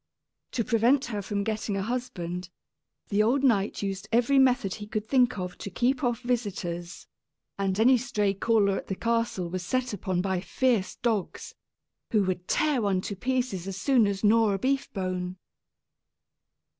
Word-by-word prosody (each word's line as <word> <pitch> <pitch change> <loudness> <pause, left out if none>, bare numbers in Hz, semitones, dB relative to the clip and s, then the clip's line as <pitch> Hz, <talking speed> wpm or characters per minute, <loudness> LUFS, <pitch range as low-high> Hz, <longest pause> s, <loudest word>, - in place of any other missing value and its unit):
To 235 - 0
prevent 245 +4 +3
her 210 -4 -3
from 200 0 -2
getting 215 -1 -2
a 195 - -1
husband, 190 -7 -4 0.6
the 205 0 +2
old 250 +6 +2
knight 210 -6 +2
used 195 +1 -4
every 245 +4 +4
method 250 -7 +3
he 210 -1 -7
could 215 0 -3
think 250 -2 +3
of 180 -1 -5
to - - -5
keep 250 +7 0
off 240 -1 0
visitors; 185 -8 -3 0.5
and 195 0 0
any 250 +2 +5
stray 210 -5 0
caller 200 -1 +2
at - - -7
the 190 - -2
castle 230 -5 -1
was 185 +2 -4
set 255 +5 -1
upon 185 -2 -2
by 190 0 0
fierce 210 +2 0
dogs, 220 -6 -2 0.6
who 215 -3 +3
would 180 -1 -2
tear 300 -5 +2
one 195 -3 +1
to 200 - -5
pieces 245 -4 -2
as 195 -1 -4
soon 240 0 +3
as 200 0 -3
gnaw 215 0 +4
a - - 0
beef 275 +6 -1
bone! 185 -1 -3
210 Hz, 170 wpm, -27 LUFS, 190-245 Hz, 0.6 s, any